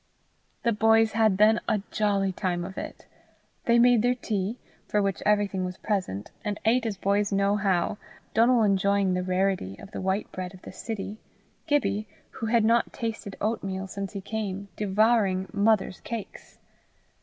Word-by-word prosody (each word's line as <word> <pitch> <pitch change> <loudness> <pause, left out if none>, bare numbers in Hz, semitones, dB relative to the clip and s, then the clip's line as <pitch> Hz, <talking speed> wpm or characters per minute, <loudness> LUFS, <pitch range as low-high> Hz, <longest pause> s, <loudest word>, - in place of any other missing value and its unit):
The 235 - +3
boys 225 +1 +4
had 220 -3 +3
then 215 +2 +5
a 205 -2 +1
jolly 200 -2 +1
time 175 -2 -2
of 190 +1 -8
it. - - -7 0.6
They 235 0 +4
made 240 -1 +5
their 245 +2 +2
tea, 215 -2 -2 0.3
for 210 - +1
which 195 -4 0
everything 205 -2 +2
was 180 0 -4
present, 185 - -3
and 205 -1 -3
ate 235 +1 +3
as 205 -3 -3
boys 200 +2 +1
know 200 +1 +2
how, 195 -1 0 0.3
Donal 235 +1 +4
enjoying 200 -1 +2
the 180 - 0
rarity 185 - 0
of 200 - -12
the - - -5
white 190 +2 -1
bread 185 0 -6
of 185 - -17
the - - -8
city, 210 +1 -5 0.5
Gibbie, 215 -8 +1 0.2
who 225 - -5
had 225 -1 +3
not 230 +1 +3
tasted 225 -4 -5
oatmeal 195 -3 -2
since 195 +1 -6
he 200 - -5
came, 200 -1 -4
devouring 205 -2 +2
"mother's 205 -2 +2
cakes." 230 -4 -8
205 Hz, 165 wpm, -27 LUFS, 190-220 Hz, 0.6 s, then